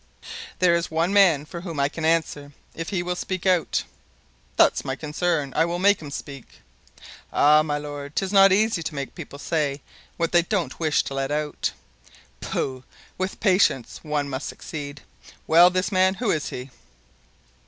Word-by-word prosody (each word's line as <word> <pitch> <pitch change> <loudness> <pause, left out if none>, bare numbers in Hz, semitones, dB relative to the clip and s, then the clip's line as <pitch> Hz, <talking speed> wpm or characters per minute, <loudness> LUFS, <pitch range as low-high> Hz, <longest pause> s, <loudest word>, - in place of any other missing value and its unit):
"There 180 -2 +4
is 170 0 0
one 165 +4 0
man 175 -8 +5
for 170 +2 -8
whom 170 -5 -6
I 140 - +3
can 160 +2 -5
answer, 155 -3 0 0.2
if 165 0 -5
he 185 -4 -1
will 180 0 -2
speak 185 0 -4
out." 180 -3 +2 0.7
"That's - - +4
my 135 - -3
concern; 150 -1 -2
I 165 - +3
will 170 +1 -2
make 200 +1 +3
him 150 - -8
speak." 140 -2 -9 0.7
"Ah, 150 +1 +5
my 150 -1 -1
lord, 145 0 -7
'tis 195 0 -1
not 195 -1 +7
easy 210 -1 +2
to 160 -1 -5
make 140 -1 -5
people 140 - -9
say 145 -2 -1 0.4
what 165 -1 -1
they 175 - +5
don't 180 +1 -2
wish 155 -2 +2
to - - -6
let 135 0 -2
out." 150 0 -2 0.7
"Pooh! 130 -1 -3 0.4
with 185 +1 -3
patience 185 - +2
one 150 -2 -2
must 135 0 -4
succeed. 145 -2 -7 0.4
Well, 170 +2 +7
this 185 +2 -1
man. 190 0 +3
Who 225 -1 0
is 155 -3 -1
he?" 125 +1 -7
160 Hz, 175 wpm, -24 LUFS, 145-180 Hz, 0.7 s, not